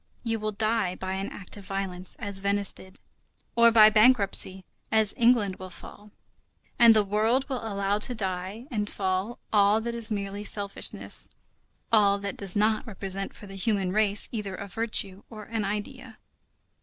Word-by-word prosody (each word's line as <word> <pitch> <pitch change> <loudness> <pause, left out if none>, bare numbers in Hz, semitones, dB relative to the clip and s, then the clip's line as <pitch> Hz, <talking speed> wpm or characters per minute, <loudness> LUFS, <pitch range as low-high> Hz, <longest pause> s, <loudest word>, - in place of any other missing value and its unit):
You 225 -2 -1
will 215 0 -2
die 215 -3 0
by 190 0 -4
an 195 +1 -3
act 195 +1 -7
of 200 - -11
violence, 190 -2 -4
as 200 -2 -4
Venice 200 0 +1
died, 190 +1 -12 0.6
or 235 0 +7
by 215 -2 +7
bankruptcy, 210 -4 +3 0.3
as 220 -2 +2
England 230 -5 +3
will 185 0 -8
fall. 205 +3 -12 0.7
And 230 -1 +8
the 215 - +4
world 220 +6 +1
will 260 -4 -4
allow 200 -1 -1
to 245 +3 +1
die 190 +2 -4
and 210 -3 -2
fall 190 +4 -2 0.2
all 205 +1 +4
that 235 +1 -4
is 230 -1 0
merely 200 -1 -4
selfishness, 205 -1 0 0.6
all 205 -3 +5
that 200 0 -5
does 195 -3 -3
not 215 +1 +1
represent 195 -2 -5
for - - -11
the 195 - -11
human 195 -1 -1
race 210 0 +1
either 210 -5 -4
a 200 - -7
virtue 200 -2 0
or 215 -2 -9
an 225 0 -3
idea. 225 +4 -5
205 Hz, 170 wpm, -27 LUFS, 195-220 Hz, 0.7 s, And